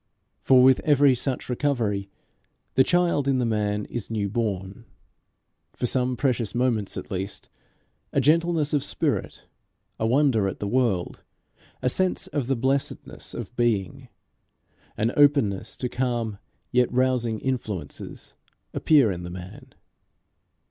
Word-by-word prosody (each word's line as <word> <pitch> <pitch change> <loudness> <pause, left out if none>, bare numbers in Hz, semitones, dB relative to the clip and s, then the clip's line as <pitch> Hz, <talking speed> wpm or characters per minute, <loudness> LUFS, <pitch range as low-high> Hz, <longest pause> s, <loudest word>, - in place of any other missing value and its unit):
For 130 -1 +5
with 130 0 +6
every 145 -2 +4
such 130 +1 -2
recovery 120 -7 -1 0.6
the 130 - +5
child 170 -4 +1
in 135 -1 +2
the 125 - +1
man 105 -2 -1
is 120 -4 -6
new 105 -3 -1
born 100 -1 -3 0.9
for - - -3
some 125 0 0
precious 120 -5 0
moments 120 -5 0
at - - -7
least; 95 +1 -4 0.6
a - - +2
gentleness 160 +1 +2
of 145 - +2
spirit, - - -2 0.6
a 110 - +1
wonder 125 -5 +3
at 95 - -4
the - - -4
world, 110 -6 0 0.6
a - - +2
sense 185 +8 +2
of 145 -5 -3
the 135 - +1
blessedness 135 +3 -2
of 125 - -7
being, 115 -6 -1 0.9
an 110 +2 +1
openness 140 -10 +3
to 125 - -2
calm 120 -5 -2 0.3
yet 125 -1 +2
rousing 125 -3 +1
influences, 105 - -5 0.4
appear 140 -9 +4
in 90 -1 -5
the 85 - -6
man. 90 +1 -10
125 Hz, 135 wpm, -25 LUFS, 105-135 Hz, 0.9 s, with